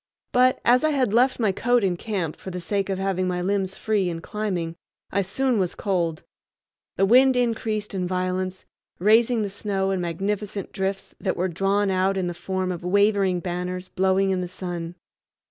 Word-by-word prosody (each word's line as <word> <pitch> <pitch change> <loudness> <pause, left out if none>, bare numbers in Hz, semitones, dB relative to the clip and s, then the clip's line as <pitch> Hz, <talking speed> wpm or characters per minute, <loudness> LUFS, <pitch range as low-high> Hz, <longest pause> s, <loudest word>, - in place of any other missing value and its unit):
But, 255 +1 +4
as 250 +3 +5
I 310 - +4
had 260 -8 +1
left 255 +3 +3
my 215 -4 +2
coat 245 +4 +2
in 185 -2 +1
camp 180 -5 -3
for - - -9
the 180 0 -5
sake 195 +3 -1
of 190 - -1
having 190 -1 0
my 180 -1 -1
limbs 190 +1 -1
free 210 -4 0
in 165 -1 -4
climbing, 175 -4 -3 0.4
I 200 - +2
soon 240 +5 0
was 180 -2 -1
cold. 170 -6 -1 0.7
The 195 - +3
wind 255 +5 +6
increased 225 -4 -1
in 185 -2 -1
violence, 185 0 -2 0.3
raising 225 +4 +4
the 205 - -2
snow 195 -1 -1
in 190 -2 -1
magnificent 195 +3 -3
drifts 195 0 -3
that 190 - -1
were 180 +2 +1
drawn 195 +3 +1
out 190 +1 +1
in 185 - 0
the 175 - -2
form 185 +1 -2
of 175 -1 -5
wavering 195 -1 +2
banners 180 +1 -4
blowing 190 +1 +2
in 185 -1 0
the 180 - -3
sun. 175 -2 -5
190 Hz, 185 wpm, -24 LUFS, 180-210 Hz, 0.7 s, wind